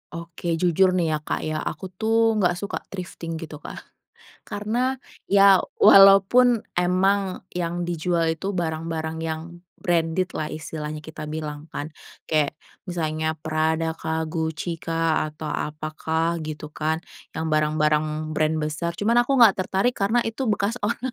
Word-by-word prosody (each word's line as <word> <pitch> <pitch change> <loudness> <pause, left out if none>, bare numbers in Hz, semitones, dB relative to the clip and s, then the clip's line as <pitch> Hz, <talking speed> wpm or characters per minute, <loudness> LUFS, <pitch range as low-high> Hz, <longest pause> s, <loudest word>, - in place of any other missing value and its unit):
Oke. 170 0 -4
Jujur 185 +2 +4
nih 180 -2 +1
ya, - - -3
Kak, - - -2
ya. 155 0 -3
Aku 160 +5 -5
tuh, 225 +4 +2
nggak 180 -4 +1
suka 200 - -4
thrifting 170 -3 -6
gitu, 155 -2 -9
Kak. - - -7 0.7
Karena, 240 +6 -1 0.3
ya 195 -1 +6 0.2
walaupun 195 +5 +7 0.2
emang 185 +2 +1
yang 175 0 -2
dijual 170 0 0
itu 190 +5 -4
barang-barang 160 -1 -3
yang 160 -1 -3 0.4
branded-lah, 170 -1 0
istilahnya 155 -1 -5
kita 160 0 -8
bilang 150 0 -5
kan. 150 +2 -5 0.3
Kayak, 155 -3 0 0.3
misalnya 160 -2 -2
Prada 160 +1 0
kah, 160 0 -2
Gucci 160 +1 -3
kah, 165 0 0
atau 155 0 -7
apakah 160 +3 -2
gitu 155 -1 -6
kan. 160 +2 -2 0.3
Yang 160 - -2
barang-barang 155 0 0
brand 155 0 +1
besar. 160 +3 -3
Cuman 230 +6 +2
aku 275 +2 +1
nggak 225 -5 +7
tertarik 190 +5 +1
karena 220 +4 +1
itu 225 +3 -3
bekas 210 +2 0
orang. 210 - 0
165 Hz, 140 wpm, -24 LUFS, 155-190 Hz, 0.7 s, walaupun